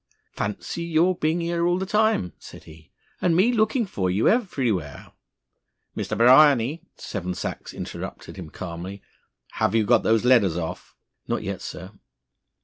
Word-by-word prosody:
"Fancy 105 +10 -4
your 170 +2 +2
being 165 +1 0
here 170 0 0
all 175 0 +2
the 190 - -2
time!" 210 - +1
said - - -12
he, 80 0 -16 0.3
"and 175 -2 +2
me 195 +8 +4
looked 220 +3 +2
for 95 - -2
you 95 +4 +1
everywhere 120 - -1 0.4
" - - -53
"Mr. - - -3
Bryany," 135 +3 +5
Seven 90 -2 -5
Sachs - - -5
interrupted - - -7
him 90 -5 -8
calmly, 90 +4 -7 0.6
"have 100 - +2
you 110 -2 +3
got - - +4
those 115 +1 +2
letters 105 -9 +4
off?" 80 -2 -6 0.3
"Not - - -2
yet, - - -4
sir." 90 +2 -8
120 Hz, 150 wpm, -24 LUFS, -, 0.6 s, Bryany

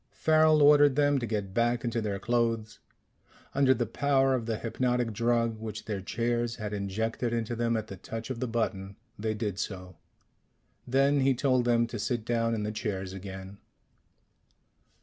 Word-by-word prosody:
Farrel 155 -1 +4
ordered 145 -1 +6
them 145 -1 +3
to 120 - -3
get 100 -3 -3
back 120 +2 +1
into 115 -1 -1
their 105 -2 -2
clothes. 115 -1 -1 0.7
Under 135 -1 +4
the 125 -2 +2
power 135 +3 +2
of 120 -3 -2
the 110 -1 -1
hypnotic 120 0 -1
drug 115 0 +1
which 110 -1 -6
their 105 -3 -3
chairs 120 +3 -1
had 105 -3 -5
injected 110 +4 -2
into 115 0 -2
them 115 0 0
at 110 - -3
the 100 -3 -9
touch 115 +6 -6
of 120 - -4
the 130 - -2
button, 100 -4 -2 0.2
they 110 0 -1
did 105 -3 -3
so. 90 -3 -6 0.9
Then 135 +3 +3
he 135 0 +3
told 130 -1 +2
them 120 -1 +3
to 115 -1 -6
sit 120 +1 -2
down 115 -1 0
in 105 - -3
the 105 - -2
chairs 95 -4 -4
again. 95 0 -8
115 Hz, 170 wpm, -29 LUFS, 105-125 Hz, 0.9 s, ordered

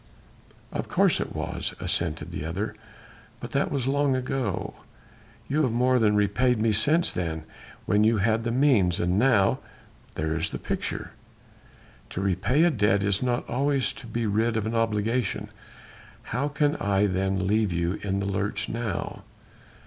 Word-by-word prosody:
"Of - - -3
course - - +3
it - - -4
was," - - -3
assented 80 -1 -1
the 75 - -4
other, 90 +7 -3 0.7
"but - - -7
that - - +1
was 135 -4 -1
long 140 0 +2
ago. 125 -5 -2 0.7
You 150 +3 +1
have 130 -6 +2
more 125 +2 +3
than 105 -2 +3
repaid 110 +5 +2
me 110 0 +2
since 150 +11 +3
then... 80 -3 -3 0.4
when 105 +1 +3
you 110 +1 +4
had 110 +3 +1
the 120 - -1
means... 120 - +3
and 90 +3 +1
now 110 -6 +3 0.6
there 80 +1 -1
is 80 +2 -1
the - - -5
picture...." - - -4 1.0
"To - - -5
repay 100 - +2
a 175 - +4
debt 105 -5 +2
is 100 -1 +2
not 125 -1 -1
always 140 +1 +1
to 120 - -11
be 115 0 -2
rid 110 +2 +1
of 110 - -1
an 110 - -2
obligation. 115 0 0 0.7
How 125 +5 -2
can 145 0 +1
I 100 0 +2
then 95 0 0
leave 105 -1 +2
you 85 +2 -1
in 100 -1 -1
the 100 - -2
lurch 100 +1 -2
now?" 115 -2 -3
110 Hz, 165 wpm, -26 LUFS, 95-125 Hz, 1.0 s, you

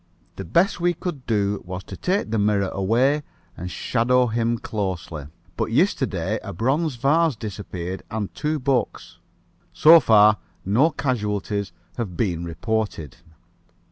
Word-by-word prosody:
The 95 - -4
best 170 - +2
we 175 0 +2
could 155 -6 -6
do 100 -2 0
was 90 +1 -6
to 95 - -9
take 185 - -1
the 110 - +1
mirror 100 -2 +2
away 120 +10 +2 0.3
and 90 - -6
shadow 125 +8 +1
him 115 0 0
closely. 90 -9 -4 0.3
But - - -2
yesterday - - +1
a - - -7
bronze 135 - 0
vase 150 +4 +2
disappeared 95 -4 -6
and 105 -2 -4
two 155 +1 -1
books. 130 -3 -2 0.5
So 165 +2 +8
far 105 -5 +5 0.3
no 120 - +4
casualties 105 - -2 0.3
have 100 -8 -4
been 85 -5 -1
reported. 85 - -3
110 Hz, 135 wpm, -23 LUFS, 95-130 Hz, 0.5 s, So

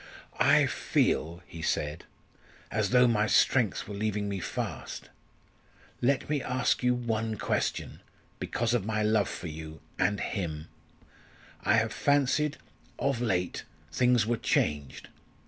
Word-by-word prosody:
"I - - +5
feel," 85 +3 0
he 85 - -9
said, 75 0 -2 0.7
"as 105 -2 0
though 125 0 +6
my 105 -3 +2
strength 115 -2 +3
were 105 - -6
leaving 105 0 -1
me 100 -1 -3
fast. - - -5 0.9
Let 130 +2 +2
me 150 -2 0
ask 125 0 0
you 125 0 +3
one 115 -2 -2
question - - -2 0.4
because 120 0 -1
of 120 -5 +1
my 110 +1 -1
love 105 -2 +2
for - - -7
you 80 -1 -7 0.2
and 100 +2 +2
him. 80 -6 -4 0.9
I 105 - +4
have 110 -1 +1
fancied 145 +1 +2 0.4
of 135 -4 0
late 90 -7 -1 0.3
things 125 +3 +3
were 120 +1 0
changed. 75 -9 -1
110 Hz, 130 wpm, -29 LUFS, 90-125 Hz, 0.9 s, though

